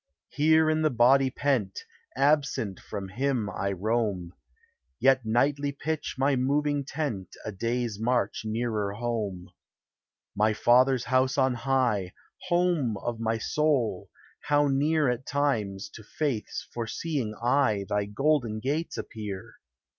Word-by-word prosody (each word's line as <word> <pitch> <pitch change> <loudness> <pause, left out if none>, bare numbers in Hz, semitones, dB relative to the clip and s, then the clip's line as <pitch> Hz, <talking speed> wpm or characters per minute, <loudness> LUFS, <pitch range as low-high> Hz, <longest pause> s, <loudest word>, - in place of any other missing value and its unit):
Here 160 +2 +4
in 155 0 +2
the 155 - +3
body 130 +2 +4
pent, 125 -8 -1 0.3
Absent 140 -7 +1
from 95 -1 -6
him 120 0 -1
I 100 - -2
roam, 100 -3 -1 0.7
Yet 130 -1 +4
nightly 140 +5 +1
pitch 155 +2 -4
my 135 +1 +2
moving 145 +2 +1
tent 135 - -4
A 110 - -3
day's 115 +1 -2
march 120 +2 0
nearer 110 -2 -2
home. 105 -6 -3 0.8
My 105 +2 +3
Father's 125 +3 +4
house 130 +2 +1
on 130 -2 +3
high, 120 -7 0 0.3
Home 175 - +1
of 115 +3 -4
my 115 0 0
soul! 125 -5 0 0.4
how 145 0 +3
near, 150 +2 +2
At 125 +1 -2
times, 110 -9 -1
to - - -12
faith's 130 -1 -3
foreseeing 120 0 -3
eye 120 -4 +1
Thy 105 0 0
golden 120 0 0
gates 145 +8 -2
appear! 105 -4 -7
125 Hz, 125 wpm, -27 LUFS, 110-140 Hz, 0.8 s, Here